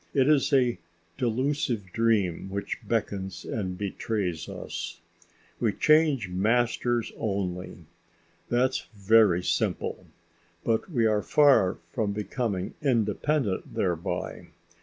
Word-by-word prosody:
It 135 Hz, -1 st, +4 dB
is 150 Hz, -2 st, +3 dB
a 125 Hz, -4 st, +3 dB, 0.4 s
delusive 120 Hz, -4 st, -1 dB
dream 105 Hz, -6 st, +1 dB
which 100 Hz, +1 st, -4 dB
beckons 100 Hz, -4 st, -2 dB
and 95 Hz, -4 st, -3 dB
betrays 100 Hz, -4 st, -3 dB
us. -, -, -6 dB, 0.6 s
We 110 Hz, -4 st, +1 dB
change 155 Hz, -, +3 dB
masters 115 Hz, +5 st, +1 dB
only. 95 Hz, -3 st, -3 dB, 0.6 s
That's 130 Hz, +2 st, +1 dB
very 100 Hz, -3 st, +4 dB
simple. -, -, -1 dB, 0.6 s
But 115 Hz, -, 0 dB
we 120 Hz, -9 st, +1 dB
are 105 Hz, -1 st, +3 dB
far 130 Hz, -8 st, +4 dB
from 105 Hz, -3 st, -1 dB
becoming 105 Hz, -2 st, -2 dB
independent 120 Hz, -2 st, 0 dB
thereby. 85 Hz, -3 st, -2 dB
110 Hz, 100 wpm, -27 LUFS, 95-125 Hz, 0.6 s, It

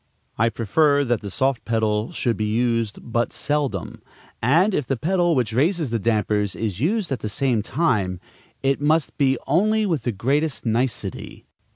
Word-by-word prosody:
I 115 Hz, +2 st, +2 dB
prefer 145 Hz, +7 st, +2 dB
that 120 Hz, -4 st, 0 dB
the 100 Hz, -, -6 dB
soft 130 Hz, +5 st, 0 dB
pedal 110 Hz, -1 st, 0 dB
should 120 Hz, -2 st, -1 dB
be 105 Hz, 0 st, -2 dB
used 115 Hz, -2 st, 0 dB
but 120 Hz, 0 st, -1 dB
seldom, 140 Hz, -, -2 dB, 0.4 s
and, 165 Hz, -, +3 dB
if 145 Hz, -8 st, -1 dB
the 135 Hz, -, -1 dB
pedal 175 Hz, +3 st, +1 dB
which 120 Hz, -4 st, 0 dB
raises 155 Hz, -, +1 dB
the 115 Hz, -, 0 dB
dampers 105 Hz, -2 st, 0 dB
is 105 Hz, -4 st, -3 dB
used 185 Hz, -, 0 dB
at 130 Hz, -, -1 dB
the 105 Hz, -, -4 dB
same 120 Hz, 0 st, 0 dB
time, 105 Hz, -, 0 dB, 0.4 s
it 135 Hz, +1 st, +1 dB
must 155 Hz, +1 st, +1 dB
be 135 Hz, -2 st, +3 dB
only 215 Hz, +9 st, +2 dB
with 165 Hz, -9 st, 0 dB
the 120 Hz, -, -1 dB
greatest 135 Hz, +9 st, -1 dB
nicety. 115 Hz, -4 st, -2 dB
125 Hz, 170 wpm, -23 LUFS, 110-150 Hz, 0.4 s, and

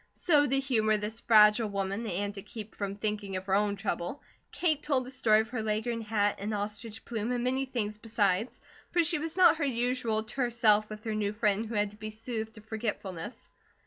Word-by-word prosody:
So 295 Hz, -4 st, +3 dB
to 270 Hz, +1 st, +2 dB
humour 220 Hz, -5 st, +2 dB
this 210 Hz, +2 st, -4 dB
fragile 215 Hz, -1 st, +6 dB
woman, 200 Hz, +3 st, -2 dB
and 205 Hz, +2 st, -2 dB
to 200 Hz, -, -7 dB
keep 215 Hz, +1 st, -9 dB
from 200 Hz, -1 st, -4 dB
thinking 210 Hz, -2 st, -3 dB
of 185 Hz, 0 st, -4 dB
her 190 Hz, -, -1 dB
own 205 Hz, 0 st, +2 dB
trouble, 195 Hz, +5 st, -3 dB, 0.3 s
Kate 310 Hz, -4 st, +1 dB
told 270 Hz, -4 st, +1 dB
the 255 Hz, -, -7 dB
story 220 Hz, -5 st, +4 dB
of 220 Hz, -, -7 dB
her 245 Hz, -2 st, -3 dB
Leghorn 220 Hz, +2 st, -1 dB
hat 210 Hz, -2 st, +1 dB
and 210 Hz, +2 st, -2 dB
ostrich 210 Hz, +2 st, -5 dB
plume, 225 Hz, 0 st, -2 dB
and 245 Hz, -1 st, -1 dB
many 260 Hz, +2 st, +1 dB
things 215 Hz, -5 st, -3 dB
besides, 215 Hz, -1 st, 0 dB, 0.3 s
for 345 Hz, -, +3 dB
she 325 Hz, -1 st, 0 dB
was 325 Hz, +3 st, -5 dB
not 355 Hz, -3 st, +7 dB
her 315 Hz, -, -1 dB
usual 240 Hz, -4 st, 0 dB
terse 240 Hz, +1 st, -2 dB
self 215 Hz, -2 st, +4 dB
with 215 Hz, 0 st, -8 dB
her 220 Hz, -, -2 dB
new 210 Hz, -1 st, -1 dB
friend 210 Hz, 0 st, +1 dB
who 225 Hz, -, -5 dB
had 205 Hz, -1 st, +1 dB
to 210 Hz, -, -16 dB
be 215 Hz, 0 st, -6 dB
soothed 220 Hz, 0 st, -5 dB
to 215 Hz, -, -11 dB
forgetfulness. 210 Hz, -3 st, -5 dB
220 Hz, 210 wpm, -30 LUFS, 210-245 Hz, 0.3 s, not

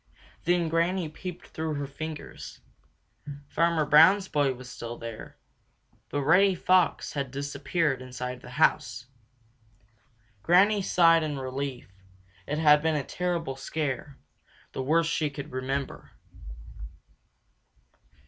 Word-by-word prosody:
Then 175 Hz, -1 st, +2 dB
Granny 170 Hz, +1 st, 0 dB
peeped 180 Hz, +3 st, -8 dB
through 160 Hz, -1 st, -3 dB
her 145 Hz, 0 st, -3 dB
fingers. 155 Hz, +3 st, -8 dB, 0.9 s
Farmer 165 Hz, 0 st, +1 dB
Brown's 175 Hz, +7 st, +6 dB
boy 145 Hz, -5 st, +1 dB
was 125 Hz, 0 st, -11 dB
still 120 Hz, -1 st, -7 dB
there, 115 Hz, -1 st, -9 dB, 0.7 s
but 145 Hz, -1 st, -2 dB
Reddy 185 Hz, +6 st, +4 dB
Fox 185 Hz, 0 st, +2 dB
had 140 Hz, -2 st, -3 dB
disappeared 140 Hz, +1 st, -2 dB
inside 125 Hz, 0 st, -6 dB
the -, -, -11 dB
house. 125 Hz, -, +1 dB, 1.4 s
Granny 200 Hz, -, +4 dB
Fox -, -, -5 dB
sighed 165 Hz, -2 st, +5 dB
in 150 Hz, -2 st, -3 dB
relief. 130 Hz, 0 st, -5 dB, 0.6 s
It 150 Hz, -, -2 dB
had 150 Hz, -1 st, +5 dB
been 160 Hz, 0 st, +1 dB
a 145 Hz, -, -1 dB
terrible 170 Hz, -4 st, -3 dB
scare, 140 Hz, 0 st, -4 dB, 0.5 s
the -, -, -4 dB
worst 165 Hz, +5 st, +2 dB
she 155 Hz, -2 st, 0 dB
could 140 Hz, +1 st, -8 dB
remember. 130 Hz, +2 st, -4 dB
150 Hz, 120 wpm, -27 LUFS, 135-165 Hz, 1.4 s, Brown's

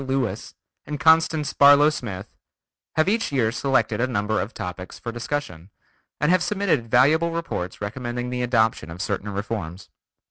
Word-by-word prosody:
Lewis, 135 Hz, -3 st, -3 dB, 0.3 s
and 150 Hz, 0 st, -4 dB
Constance 160 Hz, -1 st, +3 dB
Barlow 145 Hz, +1 st, +6 dB
Smith) 100 Hz, -9 st, -6 dB, 0.7 s
have 155 Hz, +2 st, +2 dB
each 225 Hz, -1 st, 0 dB
year 120 Hz, -5 st, +1 dB
selected 125 Hz, -3 st, 0 dB
a 125 Hz, -, +2 dB
number 110 Hz, -2 st, -1 dB
of 105 Hz, -, -5 dB
topics 90 Hz, -4 st, -7 dB
for 115 Hz, -, -6 dB
discussion, 115 Hz, -, -5 dB, 0.5 s
and 150 Hz, +3 st, +2 dB
have 185 Hz, -1 st, +4 dB
submitted 190 Hz, -, 0 dB
valuable 150 Hz, +8 st, +4 dB
reports 165 Hz, -, -4 dB
recommending 120 Hz, +3 st, -4 dB
the 125 Hz, 0 st, -2 dB
adoption 110 Hz, -8 st, +1 dB
of 80 Hz, +2 st, -9 dB
certain 100 Hz, +1 st, -3 dB
reforms. 100 Hz, -3 st, -5 dB
120 Hz, 150 wpm, -23 LUFS, 105-145 Hz, 0.7 s, Barlow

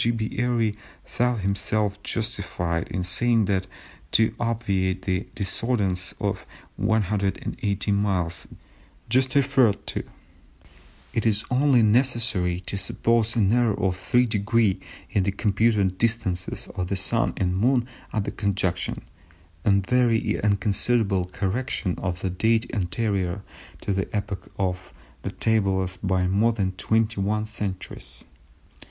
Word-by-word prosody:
B. 110 Hz, -1 st, -3 dB
Airy 120 Hz, -3 st, +1 dB, 0.3 s
thought 120 Hz, -2 st, 0 dB
himself 100 Hz, +1 st, 0 dB
justified 100 Hz, -8 st, -2 dB
in 90 Hz, +1 st, -3 dB
saying 115 Hz, +5 st, +2 dB
that 95 Hz, -2 st, 0 dB, 0.5 s
to 110 Hz, 0 st, +4 dB
obviate 100 Hz, -5 st, 0 dB
the 95 Hz, 0 st, -1 dB
discordance 100 Hz, -2 st, -1 dB
of -, -, -2 dB, 0.3 s
180 100 Hz, -1 st, 0 dB
miles 95 Hz, -4 st, 0 dB, 0.6 s
just 130 Hz, +2 st, +2 dB
referred 135 Hz, -6 st, +3 dB
to -, -, -3 dB, 1.1 s
"it 115 Hz, -, +1 dB
is 110 Hz, -1 st, +2 dB
only 130 Hz, -2 st, +4 dB
necessary 110 Hz, -6 st, +2 dB
to 100 Hz, +2 st, -1 dB
suppose 115 Hz, +2 st, +1 dB
an 105 Hz, -2 st, +3 dB
error 120 Hz, -4 st, +2 dB
of 95 Hz, -2 st, +1 dB
3′ 105 Hz, -1 st, +2 dB, 0.3 s
in 100 Hz, -, +2 dB
the 100 Hz, +1 st, +1 dB
computed 100 Hz, -2 st, +1 dB
distances 110 Hz, -6 st, 0 dB
of 90 Hz, -2 st, -2 dB
the 100 Hz, -, -1 dB
Sun 115 Hz, +4 st, +2 dB
and 90 Hz, -2 st, 0 dB
Moon 120 Hz, +4 st, +2 dB, 0.2 s
at 105 Hz, -1 st, -2 dB
conjunction, 95 Hz, -3 st, -1 dB, 0.6 s
a -, -, +2 dB
very 115 Hz, +4 st, +3 dB
inconsiderable 100 Hz, -1 st, +2 dB
correction 95 Hz, +1 st, -2 dB
for 90 Hz, 0 st, -3 dB
a -, -, +1 dB
date 110 Hz, +5 st, +2 dB
anterior 100 Hz, -2 st, -1 dB, 0.4 s
to 100 Hz, -, -1 dB
the 95 Hz, 0 st, -1 dB
epoch 100 Hz, -1 st, -4 dB
of 95 Hz, -1 st, -3 dB, 0.3 s
the -, -, -3 dB
tables 95 Hz, -4 st, +1 dB
by 95 Hz, -1 st, 0 dB
more 105 Hz, +5 st, +3 dB
than 100 Hz, -4 st, 0 dB
twenty 110 Hz, +2 st, 0 dB
one 105 Hz, +2 st, 0 dB
centuries." 100 Hz, -3 st, -5 dB
100 Hz, 120 wpm, -25 LUFS, 95-115 Hz, 1.1 s, to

